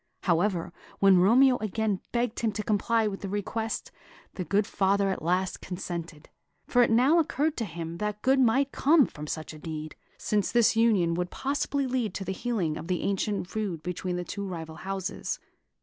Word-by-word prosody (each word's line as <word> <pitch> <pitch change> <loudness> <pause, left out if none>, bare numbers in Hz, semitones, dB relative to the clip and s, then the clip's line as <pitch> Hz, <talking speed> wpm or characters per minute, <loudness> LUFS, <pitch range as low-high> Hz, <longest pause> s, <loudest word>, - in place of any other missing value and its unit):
However, 175 -1 +1 0.2
when 195 -2 +6
Romeo 250 +7 +5
again 215 -2 -1
begged 240 -1 -1
him 225 -2 +1
to 210 +1 -3
comply 220 +2 +1
with 200 -2 -3
his 195 - -4
request, 220 +2 -3 0.4
the 185 - -4
good 200 +5 +1
father 195 0 +1
at - - -4
last 180 +3 0
consented; 170 -4 -6 0.4
for 245 - +3
it 240 - +4
now 260 +9 +5
occurred 310 0 0
to 230 - -1
him 170 -2 -6
that 210 0 -3
good 265 +1 +4
might 265 +3 +3
come 295 0 +4
of 150 0 -7
such 155 0 -5
a 155 - -11
deed, 155 -1 -6 0.2
since 210 -2 0
this 235 -2 +4
union 205 -7 +3
possibly 280 +4 -1
would 255 - -4
lead 230 -7 0
to 195 - -4
the 190 - -2
healing 190 -9 -1
of 165 - -7
the 180 -1 -1
ancient 200 -1 -1
feud 190 -6 -3
between 180 0 -3
the 180 - -2
two 200 +2 -5
rival 160 -3 -6
houses. 195 +1 -4
200 Hz, 185 wpm, -28 LUFS, 180-230 Hz, 0.4 s, when